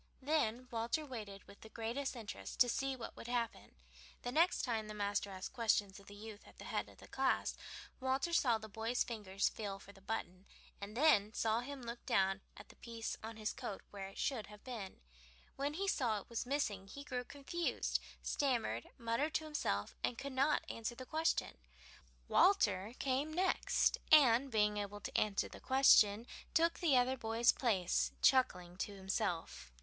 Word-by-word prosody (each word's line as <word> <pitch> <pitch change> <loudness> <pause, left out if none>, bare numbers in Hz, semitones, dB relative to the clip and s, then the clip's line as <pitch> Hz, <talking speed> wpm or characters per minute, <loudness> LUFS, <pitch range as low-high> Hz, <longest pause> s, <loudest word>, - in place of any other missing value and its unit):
Then 255 -5 +1
Walter 235 +7 -1
waited 210 -7 -7
with 200 - -16
the 220 - -11
greatest 235 +5 -3
interest 225 -4 -7
to 250 - +8
see 270 +3 -1
what 240 -3 -7
would - - -9
happen. 235 - -3 0.5
The 245 - -2
next 335 +6 +3
time 225 -4 -1
the 215 - -7
master 205 0 -1
asked 190 +3 -6
questions 210 -5 +1
of 200 - -18
the 205 - -10
youth 215 0 -10
at - - -17
the - - -10
head - - -2
of - - -17
the - - -14
class - - +1 0.4
Walter 265 +6 0
saw 245 -8 +4
the 220 0 -9
boy's 225 +3 -1
fingers 205 -4 -1
feel 200 -3 -4
for 195 +1 -13
the 195 - -18
button, 190 -2 -5 0.3
and 205 +3 -6
then 230 -8 +4
saw 225 0 +2
him 270 +1 -6
look 235 0 -6
down 195 0 +2 0.2
at - - -12
the - - -16
place 230 -1 -5
on 225 0 -7
his 215 0 -2
coat 240 -7 -6
where 195 -1 -6
it 195 - -13
should 240 -8 -1
have 210 0 -13
been. 225 -7 -7 0.5
When 285 +2 -2
he 395 +3 -1
saw 235 - +1
it - - -15
was 235 +1 -3
missing 215 -9 -1
he 280 +8 -8
grew 250 -3 -3
confused, 285 +6 -2 0.2
stammered, 235 - 0
muttered 235 +7 -1
to 315 - +1
himself, 100 - -1
and 240 - 0
could 275 +1 -5
not 275 +4 +2
answer 230 +1 -4
the 255 - -8
question. 315 - 0 0.7
Walter 215 - +3
came 275 +3 0
next, 365 +4 +2
and, 275 -3 +7
being 210 -3 +2
able 205 0 -4
to - - -6
answer 210 -2 +1
the - - -11
question, 230 -5 +5 0.3
took 335 +1 +3
the 310 -8 +4
other 255 +1 +2
boy's 225 +1 +3
place, 210 - +1
chuckling 180 -10 +3
to 200 +1 -3
himself. 190 - -2
230 Hz, 185 wpm, -36 LUFS, 205-265 Hz, 0.7 s, to